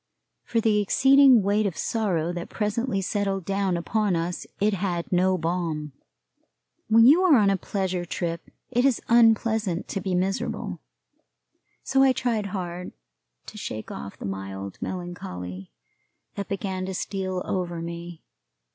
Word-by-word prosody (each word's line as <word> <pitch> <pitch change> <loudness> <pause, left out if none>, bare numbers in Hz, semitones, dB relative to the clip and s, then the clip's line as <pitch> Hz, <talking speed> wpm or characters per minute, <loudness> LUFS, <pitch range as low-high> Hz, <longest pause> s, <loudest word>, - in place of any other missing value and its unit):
For 230 - 0
the 215 -2 +3
exceeding 265 +2 +6
weight 205 +2 +2
of 185 - -5
sorrow 175 -7 -1
that 175 -1 -5
presently 210 0 -1
settled 195 -1 -1
down 195 -2 0
upon 205 +2 0
us 170 +1 -3
it 210 +1 +2
had 180 -3 -2
no 185 +1 +3
balm. 165 -3 -2 1.0
When 225 +1 +6
you 300 +8 +7
are 350 -7 +6
on 205 -3 +4
a - - +2
pleasure 185 -1 -2
trip 170 -1 -4 0.2
it 245 0 +2
is 270 -3 +3
unpleasant 225 -5 +3
to 195 - -3
be 190 -2 -1
miserable; 190 +2 -2 1.0
so 270 0 +2
I 270 -1 +5
tried 230 -5 -1
hard 180 -2 -5 0.5
to - - -9
shake 110 - -6
off 100 - -7
the - - -7
mild 95 0 -6
melancholy 95 - -6 0.6
that 200 - -5
began 190 -1 -3
to 190 - -4
steal 185 -1 -3
over 175 -2 -2
me. 170 0 -7
190 Hz, 145 wpm, -25 LUFS, 175-215 Hz, 1.0 s, you